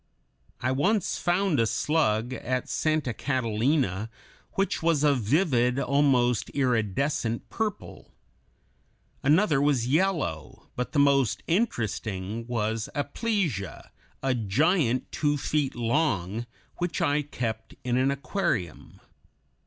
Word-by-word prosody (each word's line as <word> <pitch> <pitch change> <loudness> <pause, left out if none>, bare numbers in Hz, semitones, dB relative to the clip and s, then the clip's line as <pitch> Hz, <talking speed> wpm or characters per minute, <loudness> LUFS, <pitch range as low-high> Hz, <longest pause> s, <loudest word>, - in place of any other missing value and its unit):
I 130 - +1
once 190 +10 +1
found 175 -3 +1
a 115 - +3
slug 120 -2 +1
at 125 +1 -2
Santa 155 -6 0
Catalina 115 - 0 0.4
which 195 0 0
was 165 -3 +2
a 145 -1 +5
vivid, 125 - +2
almost 135 -5 +2
iridescent 120 0 0
purple; 220 -3 -4 1.1
another 150 0 +3
was 140 -5 +2
yellow; 150 - -1
but 125 - -3
the - - 0
most 140 -5 +3
interesting 115 - -2
was 110 -2 -2
Aplysia, 145 - -2 0.3
a 135 -1 +2
giant 125 - +1
two 145 -1 +1
feet 145 -1 -1
long, 115 - 0 0.3
which 175 -1 -2
I 145 +1 +2
kept 115 -6 -5
in 125 -1 0
an 130 +2 +3
aquarium. 140 - -3
130 Hz, 105 wpm, -27 LUFS, 115-150 Hz, 1.1 s, a